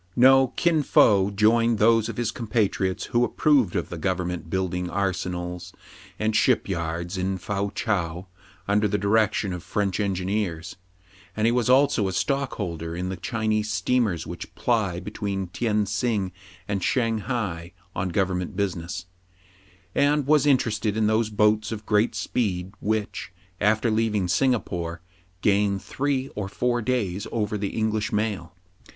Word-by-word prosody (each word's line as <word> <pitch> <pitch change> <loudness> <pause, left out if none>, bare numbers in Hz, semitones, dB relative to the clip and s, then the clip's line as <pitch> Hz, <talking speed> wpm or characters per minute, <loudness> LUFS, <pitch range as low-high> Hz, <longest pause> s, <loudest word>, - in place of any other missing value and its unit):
No: 130 +1 +6
Kin 170 -3 +2
Fo 100 -8 +4
joined 115 +3 +3
those 115 +1 +4
of - - -6
his 120 -2 0
compatriots 105 -5 -1
who 120 +1 +4
approved 130 - +2
of - - -1
the 85 - -6
government 90 -1 -2
building 90 -1 -1
arsenals 90 -1 -3 0.4
and 110 0 0
ship 125 +2 +3
yards 85 0 -3
in 95 +1 -1
Fou 100 +2 -2
Chao 90 -4 -1 0.4
under 105 +1 +3
the 105 0 0
direction 105 -2 +1
of 90 - -5
French 95 +2 -1
engineers; 95 -3 -2 0.6
and 110 - +1
he 115 - +4
was 125 0 +1
also 130 -5 +4
a 95 - -3
stockholder 90 - -2
in 90 +1 -3
the 95 - -3
Chinese 110 +2 -1
steamers 110 -7 +1
which - - -8
ply 105 -7 0
between 100 0 -3
Tien 105 +1 0
sing 105 -2 -1 0.4
and 100 -3 -2
Shang 115 -2 +1
hai 95 -7 -3 0.2
on 90 +1 -1
government 90 0 -1
business, 90 -2 -3 0.9
and 145 0 +2
was 150 0 +4
interested 110 -5 +1
in 110 - +2
those 110 +1 +2
boats 105 0 +2
of 110 -1 -5
great 105 +2 +2
speed, 95 -5 -2
which, 105 -2 -2 0.3
after 110 +2 +2
leaving 110 -4 +1
Singapore, 90 -7 0 0.4
gain 100 -1 +3
three 135 +5 -2
or 100 -2 -5
four 120 +3 0
days 105 -5 -1
over 105 -2 -1
the 100 +1 -3
English 110 -1 0
mail. 100 -5 -2
105 Hz, 145 wpm, -25 LUFS, 95-115 Hz, 0.9 s, No